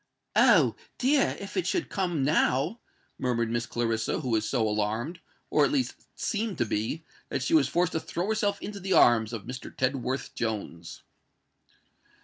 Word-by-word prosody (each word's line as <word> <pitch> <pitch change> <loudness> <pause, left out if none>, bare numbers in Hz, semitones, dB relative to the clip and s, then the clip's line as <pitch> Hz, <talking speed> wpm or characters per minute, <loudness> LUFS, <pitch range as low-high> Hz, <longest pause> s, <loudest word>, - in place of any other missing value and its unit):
"Oh! - - +5 0.2
dear, 270 +2 +2
if 200 - -8
it 370 - 0
should 355 - 0
come 175 -7 0
now!" 145 - +2 0.4
murmured 115 -3 0
Miss 120 0 -1
Clarissa, 115 -2 -1
who 130 - -3
was 110 -1 +1
so 115 -5 +1
alarmed—or 110 - -1
at - - +3
least 270 -4 -2
seemed 215 -4 -2
to 120 - +1
be—that 125 +5 -4
she 140 - -1
was 150 -5 +5
forced 175 0 +1
to 160 - -1
throw 170 +2 -3
herself 205 -2 0
into 205 -1 -5
the 190 0 -1
arms 115 -6 +5
of 115 -4 -6
Mr. 130 +1 -7
Tedworth 130 0 -1
Jones. 100 -7 -4
130 Hz, 155 wpm, -28 LUFS, 115-190 Hz, 0.4 s, Oh